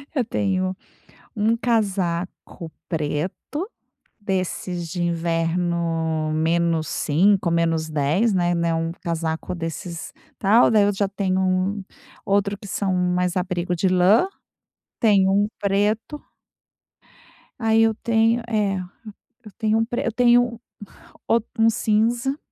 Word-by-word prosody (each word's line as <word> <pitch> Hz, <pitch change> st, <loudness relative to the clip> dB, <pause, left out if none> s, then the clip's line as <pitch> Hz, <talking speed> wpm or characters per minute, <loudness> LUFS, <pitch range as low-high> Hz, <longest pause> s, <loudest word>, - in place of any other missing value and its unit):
Eu 255 Hz, -4 st, +1 dB
tenho 185 Hz, -3 st, -1 dB, 0.6 s
1 220 Hz, +2 st, +1 dB
casaco 185 Hz, -7 st, -2 dB, 0.2 s
preto, 155 Hz, +1 st, -2 dB, 0.8 s
desses 185 Hz, -3 st, -3 dB
de 175 Hz, +2 st, -4 dB
inverno 165 Hz, -1 st, -1 dB
-5° 170 Hz, +3 st, +1 dB
menos 165 Hz, -1 st, 0 dB
-10°, 155 Hz, +9 st, +1 dB
né, 175 Hz, -2 st, +1 dB
não 165 Hz, -1 st, 0 dB
é -, -, -4 dB
casaco 165 Hz, +1 st, -3 dB
desses 165 Hz, 0 st, -6 dB, 0.2 s
tal, 215 Hz, +4 st, +5 dB
daí 215 Hz, -2 st, +4 dB
eu 205 Hz, 0 st, +2 dB
já 200 Hz, +1 st, 0 dB
tenho 190 Hz, -2 st, -1 dB
1 190 Hz, +2 st, 0 dB, 0.4 s
outro 200 Hz, 0 st, +1 dB
que 205 Hz, 0 st, -11 dB
são 195 Hz, -1 st, -1 dB
mais 180 Hz, 0 st, 0 dB
abrigo 180 Hz, -1 st, -1 dB
de 180 Hz, +3 st, +1 dB
lã 185 Hz, -, +4 dB, 0.7 s
tenho 195 Hz, -4 st, +4 dB
1 205 Hz, +1 st, +2 dB
preto. 210 Hz, +8 st, 0 dB, 1.4 s
Aí 225 Hz, -1 st, +3 dB
eu 225 Hz, 0 st, +3 dB
tenho, 225 Hz, +1 st, +1 dB
eh, 210 Hz, -4 st, 0 dB, 0.7 s
eu 210 Hz, -, -11 dB
tenho 220 Hz, -1 st, +1 dB
1 225 Hz, -, +2 dB
pre 240 Hz, +1 st, -3 dB
eu 230 Hz, -, 0 dB
tenho, 240 Hz, -1 st, +3 dB, 0.7 s
outro 230 Hz, 0 st, +1 dB, 0.2 s
1 225 Hz, -, +6 dB
cinza 235 Hz, +5 st, +1 dB
190 Hz, 120 wpm, -22 LUFS, 170-215 Hz, 1.4 s, 1